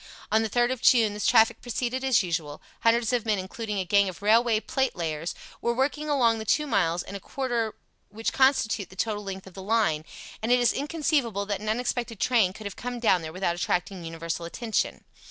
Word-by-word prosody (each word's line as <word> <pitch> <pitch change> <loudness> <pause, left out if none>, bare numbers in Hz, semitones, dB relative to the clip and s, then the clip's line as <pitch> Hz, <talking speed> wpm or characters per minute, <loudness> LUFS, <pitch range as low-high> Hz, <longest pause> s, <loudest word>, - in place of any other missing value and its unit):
On 220 +1 +4
the 220 - -1
3rd 240 +3 +2
of 260 - -3
June 225 -4 +5
this 210 - -2
traffic 225 -2 +4
proceeded 250 +1 -2
as 250 -7 +3
usual; 165 -4 -3 0.2
hundreds 230 +1 +3
of 240 -3 +1
men 215 -2 +1
including 210 +3 -4
a 190 - -1
gang 200 +1 +3
of 185 +2 -10
railway 225 +1 +4
platelayers 175 - -2 0.3
were 235 0 0
working 295 +4 -1
along 235 -6 +3
the - - -4
two 300 +8 +1
miles 175 - +1
and 200 - -9
a - - -4
quarter 240 -1 -2 0.3
which 225 +2 -3
constitute 260 -6 +2
the 190 - -14
total 210 +1 -2
length 190 -1 -6
of 190 - -13
the 190 - -8
line, 190 -7 +1 0.4
and 225 +2 -1
it 250 - +5
is 245 - +3
inconceivable 280 - 0
that 200 -1 -2
an 215 - -3
unexpected 240 -1 -2
train 225 -7 +3
could 215 +2 -11
have 200 - -5
come 245 0 -5
down 190 -6 +3
there 160 -1 -6
without 180 0 -1
attracting 180 +1 -2
universal 165 +1 -4
attention. 220 +6 -2
220 Hz, 210 wpm, -26 LUFS, 190-245 Hz, 0.4 s, June